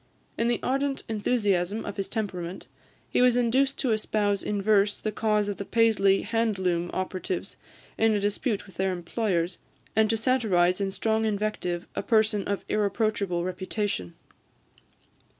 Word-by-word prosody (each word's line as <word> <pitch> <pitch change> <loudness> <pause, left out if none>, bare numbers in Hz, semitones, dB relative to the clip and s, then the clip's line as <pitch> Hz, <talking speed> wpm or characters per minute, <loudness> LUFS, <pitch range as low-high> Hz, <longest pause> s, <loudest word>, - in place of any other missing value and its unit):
In 230 - 0
the 240 - +1
ardent 275 +1 0
enthusiasm 205 -3 0
of - - -6
his 195 - -3
temperament, 190 -5 -4 0.4
he - - +1
was 250 -1 +5
induced 260 +3 +2
to 260 -5 0
espouse 210 -2 +1
in 205 -1 -2
verse 205 0 +3
the 215 - -2
cause 210 -1 +1
of 205 - -3
the - - -4
Paisley 200 -3 +3
hand 225 -2 0
loom 175 -2 0
operatives 185 0 -3 0.4
in 225 0 +4
a - - +1
dispute 205 +2 -1
with 195 - -17
their 190 0 +1
employers, 175 -1 -1 0.4
and 220 0 +4
to 225 - +2
satirise 205 -7 +2
in 195 - 0
strong 220 +3 0
invective 205 -5 -1
a - - -1
person 215 -1 +2
of 200 -1 -2
irreproachable 200 -4 0
reputation. 185 - -3
205 Hz, 150 wpm, -27 LUFS, 190-225 Hz, 0.4 s, was